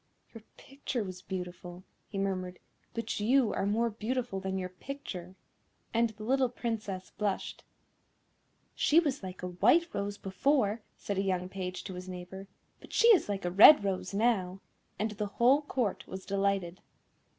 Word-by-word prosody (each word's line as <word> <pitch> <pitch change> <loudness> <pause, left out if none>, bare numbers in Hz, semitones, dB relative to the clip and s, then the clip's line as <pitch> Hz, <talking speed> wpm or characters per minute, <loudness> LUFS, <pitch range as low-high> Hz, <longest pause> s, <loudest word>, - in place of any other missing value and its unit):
"Your 225 - -10 0.2
picture 270 -4 -4
was 185 -2 -7
beautiful," 180 -1 -7 0.3
he 200 - -6
murmured, 185 -2 -2 0.4
"but 230 -2 -3
you 235 +2 +3
are 195 - -1
more 230 +3 +1
beautiful 230 -1 -3
than 190 0 -3
your 185 -1 -3
picture;" 185 -4 -8 0.6
and 230 0 +3
the 215 0 -11
little 260 +2 +2
Princess 215 -6 -4
blushed. 205 -2 -2 1.1
"She 315 - +4
was 295 -6 -1
like 185 -1 -8
a - - -1
white 245 - +3
rose 200 0 -3
before," 210 +3 +1 0.2
said 200 -1 -3
a - - +1
young 185 -2 -1
page 185 -1 -5
to 190 - -7
his 180 +1 -8
neighbour, 185 +2 -8 0.3
"but - - -14
she 465 - +5
is 390 - +5
like 195 -2 -2
a 175 - 0
red 210 +7 +9
rose 190 -2 -2
now;" 195 -3 +1 0.4
and 215 +1 -1
the 210 0 -3
whole 260 +5 +5
Court 250 -8 -2
was 190 0 -7
delighted. 195 -3 -1
200 Hz, 160 wpm, -31 LUFS, 185-235 Hz, 1.1 s, red